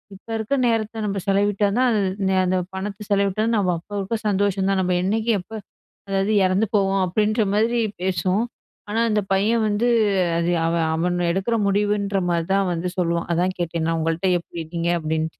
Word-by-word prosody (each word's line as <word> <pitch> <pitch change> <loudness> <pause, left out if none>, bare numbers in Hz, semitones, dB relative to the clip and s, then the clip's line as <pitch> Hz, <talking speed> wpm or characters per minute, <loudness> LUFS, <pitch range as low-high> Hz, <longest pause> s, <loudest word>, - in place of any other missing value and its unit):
இப்ப 195 - -19
இருக்க 220 +6 -1
நேரத்த 225 -1 -1
நம்ப 200 -1 -2
செலவிட்டா 205 +1 +2
தான் 255 0 +3
அது 215 - +2 0.3
நீ 190 - +1
அந்த 185 +1 +1 0.2
பணத்த 200 +2 -5
செலவிட்டா 200 +1 +1
நம்ம 195 -4 +2
அப்ப, 175 - -26
அப்ப 225 +4 -2
சந்தோஷம் 195 -1 +1
தான். 195 -1 +1
நம்ப 180 0 0
என்னைக்கி 220 +4 0
எப்ப 180 +5 -12 0.5
அதாவது 195 +2 0
இறந்து 185 +4 +2
போவோம் 195 -1 +2
அப்பிடின்ற 215 +4 +1
மாதிரி 230 +3 +2 0.2
பேசும். 190 +3 0 0.5
ஆனா 220 +2 -1
அந்த 210 -1 +2
பையன் 220 +4 +2
வந்து 215 +3 +1 0.5
அது 170 +1 0
அவன், 165 0 +1
அவன் 175 +2 0 0.2
எடுக்கிற 195 +6 0
முடிவுன்றமாரி 200 -4 0
தான் 195 -1 +2
வந்து 175 +2 -2
சொல்லுவான். 170 -1 0
அதான் 180 +2 0
கேட்டேன். 170 -1 -2
நான் 165 - 0
உங்கள்ட்ட, 165 +3 -1
"எப்பிடி 170 0 -8
இருக்கீங்க?" 170 +1 -3
அப்பிடின்ட்டு 160 0 -3
195 Hz, 170 wpm, -22 LUFS, 175-210 Hz, 0.5 s, தான்